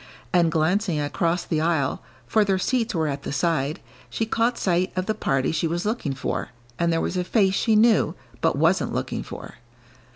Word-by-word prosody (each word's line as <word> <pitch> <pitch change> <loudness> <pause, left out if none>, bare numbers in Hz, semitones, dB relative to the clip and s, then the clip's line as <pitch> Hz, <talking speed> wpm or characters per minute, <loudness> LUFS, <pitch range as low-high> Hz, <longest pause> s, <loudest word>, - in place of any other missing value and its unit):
And 170 -2 +4
glancing 170 +2 +1
across 165 +4 0
the 155 -1 -1
aisle, 160 -5 0 0.2
for 215 - +3
their 195 -2 +1
seats 230 +2 0
were 160 -2 +1
at 140 -1 -3
the - - -5
side, 150 -1 0 0.3
she 225 - -1
caught 230 +2 +1
sight 180 0 +1
of 185 0 -1
the 215 - 0
party 135 -10 0
she 165 +1 0
was 170 +3 -2
looking 210 - -1
for, 135 - -3 0.3
and 170 0 +2
there 165 - +1
was 185 - -2
a 180 - +1
face 195 0 +2
she 220 +2 +2
knew, 215 -6 +4 0.3
but - - +2
wasn't 165 +5 +2
looking - - -2
for. - - -9
175 Hz, 195 wpm, -24 LUFS, 160-205 Hz, 0.3 s, And